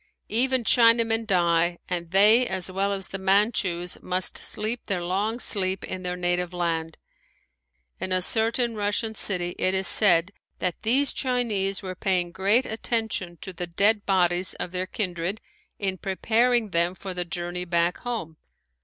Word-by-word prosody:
Even 255 +3 +2
Chinamen 230 -1 +3
die, 170 -2 +2
and 170 -2 -3
they 215 +7 +6
as 185 -1 -2
well 195 +2 -1
as 195 -2 -3
the 195 - -5
Manchus 190 -3 +1
must 185 0 -1
sleep 220 +3 -2
their 185 -4 -2
long 205 +6 -1
sleep 190 -5 +1
in 185 - -5
their 180 -1 -3
native 175 0 -1
land. 165 -2 -2 1.0
In 185 - -4
a 185 - +2
certain 230 +4 +1
Russian 210 +2 -1
city 180 -4 +1
it 185 +1 +2
is 190 0 0
said 180 -3 +3 0.3
that 180 -2 -2
these 265 +6 +2
Chinese 215 -7 -1
were 185 -1 -5
paying 180 -2 -1
great 200 +7 +2
attention 220 -6 -3
to 190 - -7
the 175 0 -5
dead 205 +5 +2
bodies 180 -1 +1
of 175 - -6
their 185 0 -3
kindred 185 0 -3 0.4
in 190 -2 -2
preparing 225 +3 +1
them 170 +2 +1
for 190 0 -7
the 180 0 -2
journey 175 0 -4
back 170 0 0
home. 220 -10 -5
190 Hz, 155 wpm, -25 LUFS, 180-220 Hz, 1.0 s, they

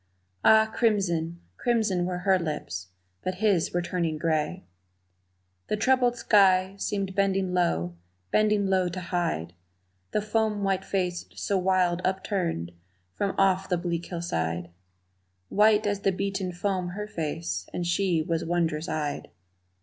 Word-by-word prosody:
Ah, 220 0 +7
crimson, 170 -7 +1 0.2
crimson 215 -7 +1
were 180 -1 -2
her 190 +1 +3
lips, 150 - -4 0.4
but 185 - -2
his 195 -4 +2
were 175 0 0
turning 170 -3 -1
gray. 160 +3 -1 1.0
The 210 - 0
troubled 245 +1 +3
sky 190 -4 +4
seemed 195 -2 -2
bending 195 -1 +1
low, 85 - 0 0.3
bending 210 -1 +3
low 190 -2 +2
to 175 - -5
hide 170 - -2 0.6
The 205 - -1
foam 215 -1 0
white 195 -1 +1
face 180 -3 -1
so 200 -2 0
wild 180 -1 +2
upturned 185 - -1 0.4
from 200 -1 -1
off 190 -1 +2
the 180 - +2
bleak 170 -1 -3
hillside 85 - -3 0.8
White 210 +1 +4
as 205 -1 0
the 195 - +2
beaten 195 0 -2
foam 180 -1 -2
her 210 - -3
face, 90 - -4
and 175 - -3
she 175 -2 +1
was 165 0 -1
wond'rous 165 -2 -1
eyed. 150 -2 -3
185 Hz, 135 wpm, -27 LUFS, 170-200 Hz, 1.0 s, Ah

